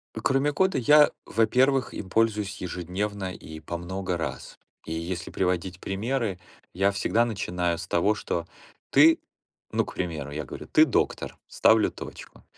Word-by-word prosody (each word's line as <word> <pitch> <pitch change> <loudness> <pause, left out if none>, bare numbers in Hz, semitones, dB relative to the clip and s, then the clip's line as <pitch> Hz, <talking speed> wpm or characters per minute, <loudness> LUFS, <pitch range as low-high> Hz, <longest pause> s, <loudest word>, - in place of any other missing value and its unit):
Кроме 135 +2 +1
кода, 190 +4 +1
я, 150 +4 +6
во-первых, 130 +4 +2
им 95 - -6
пользуюсь 105 -2 +1
ежедневно 95 +2 -3
и 80 -2 -10
по 85 +3 -5
много 90 +1 -3
раз, 80 - -6 0.3
и 80 - -7
если 85 +2 -4
приводить 90 0 -1
примеры, 110 0 -2 0.4
я 95 +2 +2
всегда 110 +4 +1
начинаю 90 -6 -1
с 90 +2 -7
того, 100 +5 +2
что 85 -5 -3 0.4
ты, 160 +4 +6 0.5
ну, - - +1
к - - -9
примеру, 80 -6 -4
я 75 +1 -4
говорю: 65 - -9
"Ты - - +6
доктор", - - -1
ставлю 110 -1 +4
точку, - - -10
95 Hz, 150 wpm, -26 LUFS, 85-115 Hz, 0.5 s, я